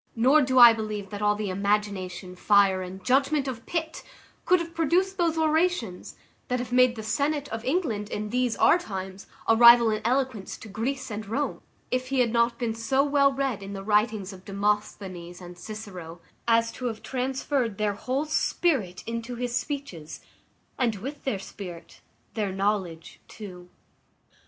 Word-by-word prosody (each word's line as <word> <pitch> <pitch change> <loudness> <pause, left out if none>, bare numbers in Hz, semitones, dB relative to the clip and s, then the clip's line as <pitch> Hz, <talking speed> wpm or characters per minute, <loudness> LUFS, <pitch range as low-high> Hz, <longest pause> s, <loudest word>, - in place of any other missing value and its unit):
Nor 260 +7 +5
do 260 -1 +1
I 240 -2 +10
believe 215 -3 -5
that 205 0 -6
all 210 0 +3
the 210 -2 -3
imagination, 195 -2 -2
fire, 195 -1 +4
and 185 +1 -8
judgment 275 +2 +2
of 235 -3 -6
Pitt, 325 -2 -3 0.4
could 365 0 +4
have 335 0 -6
produced 360 +4 +1
those 335 -2 +1
orations 315 - 0 0.3
that 250 - 0
have 250 0 -5
made 250 0 +4
the 220 - -6
senate 285 +6 -1
of 225 0 -5
England, 250 - -1
in 210 0 -4
these 250 -1 +1
our 350 - +5
times, 190 - -7 0.2
a 225 - +5
rival 235 0 +8
in 215 0 -2
eloquence 255 -4 -1
to - - -11
Greece 250 +5 -3
and 210 0 -5
Rome, 275 +8 -2 0.3
if 255 0 -1
he 270 0 0
had 240 -2 +3
not 235 0 +2
been 235 -3 -2
so 265 +5 +1
well 280 -1 +3
read 270 -6 -2
in 195 0 -7
the 195 -1 -6
writings 210 -1 +1
of 185 -1 -13
Demosthenes 195 -3 -3
and 180 -1 -10
Cicero, 180 -4 -8 0.3
as 230 0 +3
to 255 - -7
have 225 -3 -4
transferred 260 -3 -2
their 210 -1 0
whole 260 +8 -2
spirit 270 - 0
into 230 +1 -4
his 245 0 -3
speeches, 260 - -5 0.6
and, 235 -4 +1
with 270 +9 -7
their 265 -7 0
spirit, 180 -3 -10 0.3
their 210 -3 -2
knowledge 190 -4 -2
too. 180 -4 -10
225 Hz, 170 wpm, -26 LUFS, 200-265 Hz, 0.6 s, I